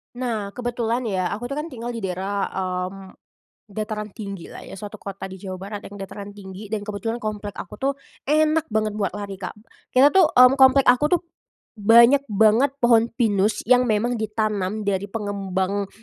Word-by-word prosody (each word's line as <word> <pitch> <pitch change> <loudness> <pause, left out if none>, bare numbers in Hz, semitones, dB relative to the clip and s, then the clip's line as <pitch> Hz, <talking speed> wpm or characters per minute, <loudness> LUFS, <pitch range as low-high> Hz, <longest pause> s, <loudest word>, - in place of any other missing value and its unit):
Nah, 230 -5 -2
kebetulan 240 0 -2
ya 190 -5 -1
aku 215 +4 -5
tuh 290 - -2
kan 315 - -4
tinggal 240 -4 -6
di 230 - -5
daerah, 195 +1 -2
mmm, 185 +1 -4 0.6
dataran 210 +1 -4
tinggilah 200 -5 -8
ya - - -10
suatu 205 +1 -8
kota 195 -1 -7
di 190 - -9
Jawa 185 -2 -6
Barat 205 +1 -6
yang 205 - -11
dataran 200 +1 -7
tinggi 195 +1 -9
dan 215 - 0
kebetulan 225 +2 -3
komplek 210 -1 -4
aku - - -8
tuh 275 +1 +1 0.4
enak 310 +1 +3
banget 215 -1 0
buat 200 -2 -1
lari, 200 -1 -6
Kak. 180 +2 -6 0.3
Kita 275 +3 +5
tuh 375 -5 +6
mmm, 250 +1 +7
komplek 265 +1 +7
aku 295 +7 +4
tuh - - -8 0.6
banyak 235 +6 +6
banget 220 +6 +3
pohon 230 -1 +5
pinus 210 -3 +1
yang 250 +1 +4
memang 230 +2 +1
ditanam 215 -1 -1
dari 200 0 -1
pengembang 200 -2 -2
215 Hz, 170 wpm, -23 LUFS, 200-245 Hz, 0.6 s, mmm